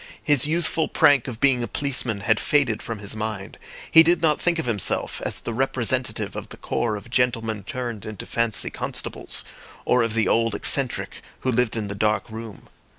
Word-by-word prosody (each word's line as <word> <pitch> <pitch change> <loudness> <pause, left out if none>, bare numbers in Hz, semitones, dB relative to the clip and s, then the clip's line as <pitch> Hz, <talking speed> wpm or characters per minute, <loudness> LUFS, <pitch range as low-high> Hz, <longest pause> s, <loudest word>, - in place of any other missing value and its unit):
His 145 -2 +3
youthful 160 0 +1
prank 140 -4 +4
of 115 -4 -6
being 130 -3 +3
a 120 - -1
policeman 130 -7 -2
had 110 +2 +2
faded 140 -8 +1
from 115 - -5
his 100 +1 -5
mind; 110 -2 -5 0.3
he 165 - +10
did 170 +1 +4
not 155 -2 +2
think 175 -1 +1
of 160 - -2
himself 110 -6 -1
as - - -2
the 120 - -5
representative 130 0 -1
of - - -6
the - - -10
corps 115 -3 -1
of 110 +3 -9
gentlemen 115 -4 0
turned 120 0 -5
into 110 -3 -7
fancy 115 -3 0
constables, - - -3 0.4
or 125 - +3
of 115 -1 0
the 110 - +2
old 115 -1 +2
eccentric - - -1 0.2
who 130 - 0
lived 125 -1 +1
in 105 -2 -2
the 100 - -4
dark 105 +1 0
room. 110 -2 -9
115 Hz, 190 wpm, -24 LUFS, 110-135 Hz, 0.4 s, he